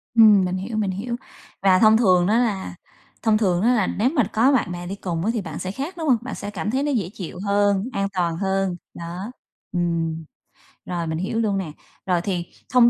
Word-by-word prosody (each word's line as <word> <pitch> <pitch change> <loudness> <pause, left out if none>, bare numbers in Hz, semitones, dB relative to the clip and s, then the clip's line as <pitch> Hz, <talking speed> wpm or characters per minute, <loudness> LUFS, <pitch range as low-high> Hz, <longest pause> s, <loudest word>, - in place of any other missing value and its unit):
Ừm, 210 -4 +7
mình 180 +1 -1
hiểu, 215 +4 -4
mình 200 -3 0
hiểu. 235 +6 -3 0.5
Và 185 -1 +5
thông 220 0 +6
thường 185 -5 +4
á 225 +3 +3
là 200 -7 -1 0.5
thông 220 -1 +4
thường 185 -4 +1
á 245 +3 +4
là 215 -6 +2
nếu 235 +5 +1
mà 275 -6 +2
có 245 +6 +4
bạn 220 -8 +1
bè 175 0 -6
đi 195 - -4
cùng 175 -2 -3
á 225 - +2
thì 220 - -1
bạn 160 -4 -6
sẽ 185 - -3
khác, 285 - -5
đúng 320 -2 -3
hông? 245 - +5
Bạn 255 - -6
sẽ 205 - -6
cảm 205 +1 -3
thấy 270 +2 0
nó 295 - 0
dễ 200 -9 0
chịu 180 -3 -7
hơn, 200 +2 +2
an 195 0 0
toàn 170 -3 0
hơn. 195 -1 0 0.2
Đó, 175 +7 -6 0.4
ừm. 165 -2 -1 0.6
Rồi, 170 -2 -3
mình 160 0 -2
hiểu 195 +6 -2
luôn 205 -3 +1
nè. 175 -6 -3 0.3
Rồi 180 -2 +1
thì 180 -2 -2 0.3
thông 240 -1 +7
195 Hz, 230 wpm, -23 LUFS, 180-225 Hz, 0.6 s, Ừm